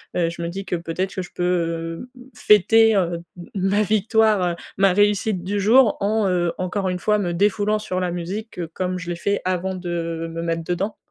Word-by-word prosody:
heu, 170 -2 +1
je 170 - -9
me 170 - -2
dis 195 +3 -6
que 185 - -2
peut-être 175 +3 -3
que 185 - -2
je 180 - -12
peux, 165 0 -2
hem, 250 +1 -15
fêter, 220 +2 +5
heu, 175 -3 0 0.2
m 175 - -10 0.2
ma 205 +2 +2
victoire, 215 -3 +2 0.2
ma 195 -1 +4
réussite 205 -1 +1
du 200 +3 -2
jour 225 +3 +5
en, 210 +1 +1
heu, 175 -2 0
encore 185 +1 -1
une 180 0 -2
fois 210 +3 +2
me 180 -4 -1
défoulant 210 +3 +1
sur 185 -3 -3
la 180 -1 -1
musique 180 +5 -5
comme 185 0 -2
je 175 -1 -7
l'ai 175 - -2
fait 200 +4 -1
avant 185 +1 -1
de 170 -2 -4
me 165 0 -5
mettre 165 0 -2
dedans. 180 +5 -2
185 Hz, 205 wpm, -22 LUFS, 175-205 Hz, 0.2 s, fêter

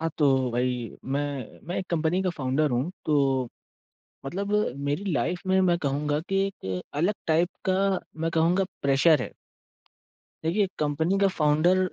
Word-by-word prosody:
हाँ, 165 0 -1
तो 135 -4 +3
भाई 125 0 -1
मैं 140 -2 -3
मैं 175 - -3
एक 185 - -4
कंपनी 170 +2 +1
का 185 - +1
फ़ाउंडर 145 -1 0
हूँ। 125 +7 0 0.2
तो 135 -4 +2 0.8
मतलब 200 +8 -3 0.3
मेरी 180 +8 -1
लाइफ़ 175 +4 -1
में 190 0 +4
मैं 175 -2 +3
कहूँगा 145 +1 0
कि 195 0 +2
एक 95 - -5
अलग 175 +8 +1
टाइप 165 +2 +3 0.2
का 185 - +3 0.4
मैं 165 0 0
कहूँगा 170 +4 +3 0.2
प्रेशर 140 +2 +4
है। - - -6 1.1
देखिए 195 +5 +2
कंपनी 160 +6 +1
का 195 0 +4
फ़ाउंडर 160 +2 +3
155 Hz, 150 wpm, -26 LUFS, 140-180 Hz, 1.1 s, में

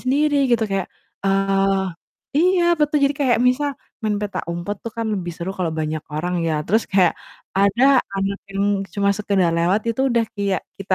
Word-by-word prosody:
sendiri 280 +1 +2
gitu 235 -2 +3
kayak 195 -1 -1 0.4
eee, 195 0 +2 0.5
iya 360 +1 +4 0.2
betu 300 0 +1
jadi 280 +1 +3
kayak 250 -4 +3
misal 285 +3 +1 0.3
main 215 -1 0
petak 205 -1 -3
umpet 175 +4 -4
tuh 230 - -4
kan 230 -1 -2
lebih 175 -3 -3
seru 175 +2 -4
kalau 175 -3 0
banyak 155 0 -2
orang 175 +4 -2
ya 160 - +1
terus 220 +5 +3
kayak 185 -3 +4 0.5
ada 200 +5 +3 0.4
anak 195 +1 -1
yang 195 0 -1 0.3
cuma 200 -1 +2
sekedar 195 -4 +1
lewat 180 +5 +2
itu 230 - -3
udah 235 -1 +2
kayak 200 -4 -1 0.2
kita 195 -1 0
200 Hz, 175 wpm, -21 LUFS, 190-235 Hz, 0.5 s, iya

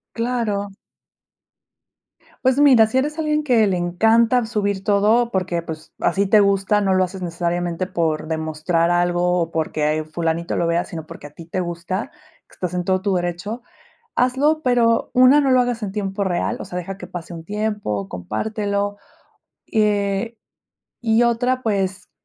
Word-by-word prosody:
Claro. 230 -4 -2 1.7
Pues, 260 +1 +3
mira, 250 -7 +6
si 255 - 0
eres 300 +4 -1
alguien 305 -1 0
que 240 -6 +4
le 190 - 0
encanta 225 +8 +3
subir 205 -3 -1
todo 215 +4 +3
porque, 185 -4 -1
pues, 160 -2 -8
a - - +2
si 200 +2 +1
te 210 +2 +5
gusta, 200 +1 +2
no 195 -2 +1
lo 185 0 +3
haces 185 +1 -7
necesariamente 175 +1 -2
por 165 -4 -1
demostrar 160 +2 0
algo, 175 0 +2
o 165 0 -4
porque, 155 -1 0
eh, 155 - -3
fulanito 165 +1 -2
lo 170 - +1
vea, 170 +1 +1
sino 160 -2 -8
porque 145 - -10
a - - -23
ti 160 +3 -12
te 185 +3 -3
gusta, 175 +6 -4
que 315 +2 -25
estás 180 -1 -4
en 180 - 0
todo 185 +1 +1
tu 195 0 0
derecho, 180 +6 -3 0.5
hazlo, 275 +5 +2
pero 235 -2 +2
1, 255 +3 +6
no 275 -2 +2
lo 255 - +5
hagas 245 -2 -1
en 195 - -5
tiempo 200 -1 -2
real, 190 +6 -1
o - - -6
sea, 180 - -8
deja 190 +2 -6
que 180 - -8
pase 175 -1 -8
un 165 -1 -8
tiempo, 205 - -3
compártelo. 205 - -3 0.7
Y, 220 - +1
eh, 205 +2 0 0.6
y 225 0 +3
otra, 245 +2 +1
pues, 195 -4 -2
195 Hz, 175 wpm, -21 LUFS, 175-230 Hz, 1.7 s, mira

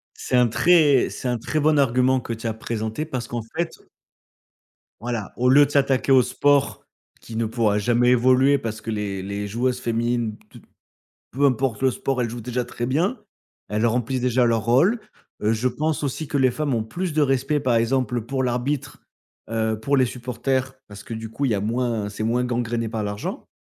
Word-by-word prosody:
C'est - - -1
un 125 -1 +5
très 150 -1 +4
c'est 125 - -5
un 120 -1 0
très 155 +7 -2
bon 150 0 +3
argument 130 0 +3
que 115 - -6
tu 115 +1 -6
as 110 - -1
présenté 110 +4 -4
parce 130 -7 -5
qu'en 120 -2 -3
fait, 170 -1 0
heu - - -26 1.1
voilà, 115 -3 -4
au 125 +1 +2
lieu 145 +2 +7
de 140 - -5
s'attaquer 135 -1 +1
au 130 - +7
sport 140 +3 +1 0.4
qui 115 - -9
ne 115 0 0
pourra 110 -2 +1
jamais 120 +3 +2
évoluer, 130 +3 +4
parce 115 -3 -5
que 115 - -5
les 100 -3 -3
les 100 +1 -4
joueuses 125 +4 -1
féminines, 115 -1 -1
toutes - - -15 0.7
peu 140 +3 0
importe 130 -3 +1
le 130 - +4
sport, 130 0 -2
elles 115 - -2
jouent 120 0 -6
déjà 125 +2 -2
très 120 0 -5
bien, 180 - 0 0.5
elles 105 +2 -1
remplissent 125 +2 0
déjà 125 0 +2
leur 115 -2 +1
rôle. 160 - +3 0.4
Heu, 110 +2 +2
je 115 +3 +1
pense 150 +5 -2
aussi 145 +2 -3
que 140 - -1
les 130 -1 +4
femmes 145 0 -1
ont 110 -1 -1
plus 175 +8 -4
de 155 - +1
respect 135 +2 +1
par 125 -2 +1
exemple, 125 +2 +1
heu, 110 - -5
pour 135 0 -1
l'arbitre, 130 +3 -2 0.5
heu, 110 -1 0
pour 140 +6 0
les 130 -1 +4
supporters, 130 +2 -2
parce 100 -1 -10
que - - -10
du 110 0 -6
coup 140 +5 -3
il 135 - +2
y 110 - +2
a 100 - -1
moins, 115 -1 -1
c'est 105 +1 -6
moins 120 +2 +1
gangréné 120 -2 -2
par 110 -1 -3
l'argent, 105 0 -5
125 Hz, 210 wpm, -23 LUFS, 115-135 Hz, 1.1 s, lieu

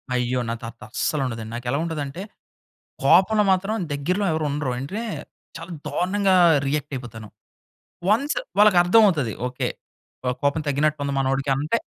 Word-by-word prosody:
అయ్యో! 125 0 0
నా - - -1
తాత 115 0 -8
అస్సలు 150 +4 -1
ఉండదండి. 115 -3 -5
నాకు 120 - -7
ఎలా 140 - +1
ఉంటదంటే, 155 -1 -4 0.8
కోపంలో 195 +9 +5
మాత్రం 195 +3 +1 0.2
దగ్గరలో 180 +8 -1
ఎవరు 155 -1 -1
ఉండరు. 145 -2 -2
ఏంటే 165 - -4 0.6
చాలా 165 +2 -9 0.2
దారుణంగా 190 +1 +1 0.3
రియాక్ట్ 145 0 -2
అయిపోతాను. 115 -4 -8 0.8
వన్స్ 280 - +2 0.2
వాళ్ళకి 210 -2 +6
అర్థం 190 +6 +5
అవుతది. 150 - 0
ఓకె, 125 0 -2 0.5
కొ 125 - 0
కోపం 145 +2 +1
తగ్గినట్టు 150 +1 +1
ఉంది 140 0 -2
మనోడికి 135 +1 0
అంటే 150 +11 0
150 Hz, 145 wpm, -23 LUFS, 130-185 Hz, 0.8 s, వాళ్ళకి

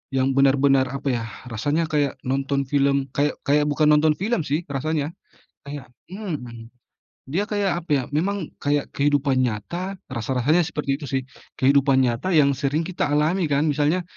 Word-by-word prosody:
yang 130 0 +2
benar-benar 135 0 +4
apa 140 - -5
yah, 115 -1 -3 0.2
rasanya 150 +8 -1
kayak 145 -3 +1
nonton 135 +1 -1
film 140 -1 +2
kayak 145 +1 +2
kayak 145 +1 +2
bukan 150 +1 +2
nonton 150 +1 +4
film 200 +2 -1
sih 150 +5 0
rasanya. 145 +2 -1 0.6
Kayak 140 -2 -7 0.2
mhm, 130 - -6 0.6
dia 180 +9 0
kayak 205 -3 0
apa - - -38
ya, 135 -3 +2
memang 195 0 -1
kayak 145 0 0
kehidupan 140 -2 +1
nyata, 175 - -4 0.2
rasa-rasanya 130 +8 +1
seperti 150 -4 -3
itu 145 - -7
sih. 135 0 -1 0.3
Kehidupan 135 0 +4
nyata 125 +9 0
yang 145 -3 +5
sering 145 +3 0
kita 170 -3 -2
alami 160 +5 +2
kan. 145 0 +1
Misalnya 150 +5 +1
145 Hz, 155 wpm, -23 LUFS, 135-160 Hz, 0.6 s, yang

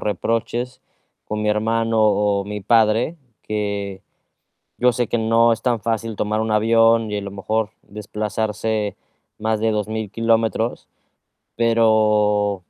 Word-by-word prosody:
reproches 115 +4 -2 0.5
con 105 0 -3
mi 105 - 0
hermano 115 +1 0
o 105 -2 +2
mi 105 +1 -5
padre, 115 - +2 0.3
que 100 -2 -3 0.8
yo 125 0 +4
sé 120 0 -1
que 120 - -1
no 115 +1 +3
es - - -7
tan 120 -3 +1
fácil 115 -1 -2
tomar 105 +1 -1
un 110 0 -2
avión 115 0 +3
y, 105 - -1
a - - -3
lo 100 - -6
mejor, 105 +1 -2
desplazarse 105 0 -3 0.4
más 110 0 -1
de 110 0 +1
2000 110 0 -3
kilómetros. 115 +1 0 0.7
Pero 105 -3 +3
110 Hz, 130 wpm, -21 LUFS, 105-115 Hz, 0.8 s, yo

